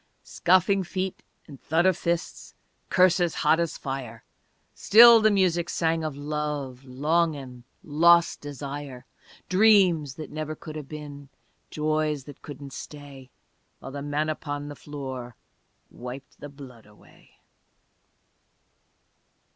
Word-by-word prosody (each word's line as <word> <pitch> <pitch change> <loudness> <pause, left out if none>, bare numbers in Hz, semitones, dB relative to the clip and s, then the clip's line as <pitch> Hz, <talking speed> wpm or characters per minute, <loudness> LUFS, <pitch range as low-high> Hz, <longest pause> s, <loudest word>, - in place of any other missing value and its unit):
Scuffling 185 +2 +2
feet 185 +1 -4 0.2
and 140 -3 -13
thud 165 +3 +1
of 185 -2 +4
fists, 170 0 -4 0.3
Curses 180 -2 +3
hot 160 - +3
as 170 -2 -2
fire 130 -5 -6 0.5
Still 230 +1 +8
the 215 - +5
music 180 -4 +1
sang 165 -1 0
of 155 -3 -4
love, 145 -3 -4
Longin', 140 -2 -1 0.2
lost 170 +3 +4
desire, 140 -2 -7 0.4
Dreams 185 -8 +4
that 155 - -8
never 155 0 -4
could 155 -1 -10
have 150 -3 -7
been 145 -2 -9 0.4
Joys 155 -2 -1
that 145 0 -13
couldn't 140 -2 -10
stay 140 -2 -10 0.5
While 135 - -10
the 140 +1 -6
man 145 +2 -1
upon 145 -1 -5
the 145 - -8
floor 130 -5 -7 0.6
Wiped 125 +2 -10
the 145 - -8
blood 130 -6 -13
away. 105 0 -22
150 Hz, 120 wpm, -26 LUFS, 140-170 Hz, 0.6 s, Still